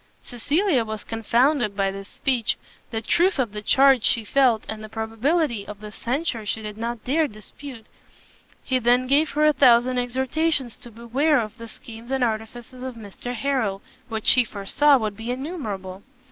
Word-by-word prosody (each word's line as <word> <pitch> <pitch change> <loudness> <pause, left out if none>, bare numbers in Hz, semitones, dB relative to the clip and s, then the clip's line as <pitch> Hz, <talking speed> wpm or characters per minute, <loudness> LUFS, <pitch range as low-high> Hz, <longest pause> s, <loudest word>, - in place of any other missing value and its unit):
Cecilia 285 - +1
was 220 -1 -5
confounded 235 0 +1
by 195 -1 +1
this 195 0 -8
speech: 245 -2 -1 0.3
the 225 -2 -4
truth 355 - +2
of 245 -6 0
the 210 0 -6
charge 270 +2 +5
she 230 +2 +2
felt, 245 -2 +3
and 215 0 -5
the 215 - -8
probability 225 +3 -1
of 210 -1 -8
the 210 0 -9
censure 245 0 -2
she 220 +1 -3
did 210 -1 -6
not 230 0 -4
dare 305 +4 +2
dispute. 225 +2 -11 0.8
He 260 -2 0
then 245 +1 +3
gave 290 +4 +3
her 300 +1 +3
a 305 - +5
thousand 250 -2 +4
exhortations 260 +2 -1
to 240 - -10
beware 250 +6 +1
of 215 -1 -5
the 230 - -8
schemes 230 +1 -11
and 265 -1 0
artifices 235 +2 -4
of 260 -1 -5
Mr 230 +3 -7
Harrel, 235 -7 -1 0.3
which 220 -1 +3
he 250 - +5
foresaw 235 +7 +2
would 215 -4 -3
be 225 +3 -7
innumerable. 220 - -5
240 Hz, 175 wpm, -23 LUFS, 220-270 Hz, 0.8 s, charge